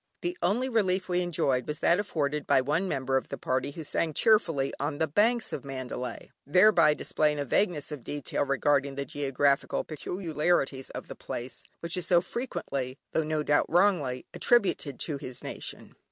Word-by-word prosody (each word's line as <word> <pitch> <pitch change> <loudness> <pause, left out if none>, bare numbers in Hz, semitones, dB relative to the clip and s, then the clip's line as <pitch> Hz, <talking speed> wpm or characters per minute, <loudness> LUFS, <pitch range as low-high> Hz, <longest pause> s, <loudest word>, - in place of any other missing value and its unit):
The 350 +1 -2
only 230 +8 +1
relief 195 -6 +1
we 180 -1 +1
enjoyed, 140 -7 0
was 150 - -2
that 170 +3 +3
afforded 150 -7 -2
by - - +5
one 150 +8 0
member 135 -4 0
of 130 - -3
the - - -4
party 130 +1 -1
who 160 +3 -7
sang 155 +1 -1
cheerfully: 165 -11 +3
"On 145 +1 -2
the 160 - +2
Banks 220 +9 +2
of - - -4
Mandalay," 130 -3 -6
thereby 180 -1 +5
displaying 150 0 0
a 145 - -2
vagueness 160 - 0
of 145 -5 -6
detail 145 -1 -2
regarding 140 0 +1
the 140 0 -3
geographical 140 0 +1
peculiarities 155 -4 -1
of - - -7
the - - -7
place, 125 +2 -6 0.2
which 170 0 -2
is 180 -2 -3
so 175 -2 +5
frequently 140 - -4
(though - - +2
no 155 0 -1
doubt 145 0 +2
wrongly) 165 -9 +2
attributed 195 - +1
to 150 -4 -2
his 130 -3 -8
nation. - - -7
150 Hz, 175 wpm, -28 LUFS, 140-180 Hz, 0.2 s, by